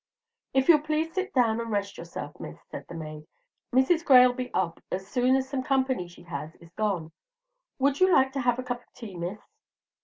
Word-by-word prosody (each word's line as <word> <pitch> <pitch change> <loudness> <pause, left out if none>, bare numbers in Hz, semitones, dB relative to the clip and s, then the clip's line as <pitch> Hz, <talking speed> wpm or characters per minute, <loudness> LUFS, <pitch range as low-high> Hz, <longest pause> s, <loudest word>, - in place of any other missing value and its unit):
"If 265 0 +3
you'll 320 -3 +8
please 310 +2 -1
sit 380 0 -2
down 230 -3 +2
and 230 - -5
rest 200 -2 -2
yourself, - - -8
Miss," - - -8
said - - -7
the - - -9
maid, 155 -1 -8 0.4
"Mrs. 265 +7 +3
Gray'll 250 -4 +7
be 250 0 -5
up 170 -3 -1
as 190 +1 -3
soon 250 +5 +2
as 265 0 0
some 270 -1 -2
company 260 -7 0
she 175 0 -15
has 155 -1 -6
is 170 0 -17
gone. 185 -6 -2 0.7
Would 275 +1 +1
you 370 0 +5
like 265 -5 +4
to 275 - -1
have 245 -1 +2
a 255 - -3
cup 245 -1 -3
of - - -31
tea, 215 -6 -9
Miss?" 175 +4 -4
245 Hz, 210 wpm, -27 LUFS, 185-265 Hz, 0.7 s, you'll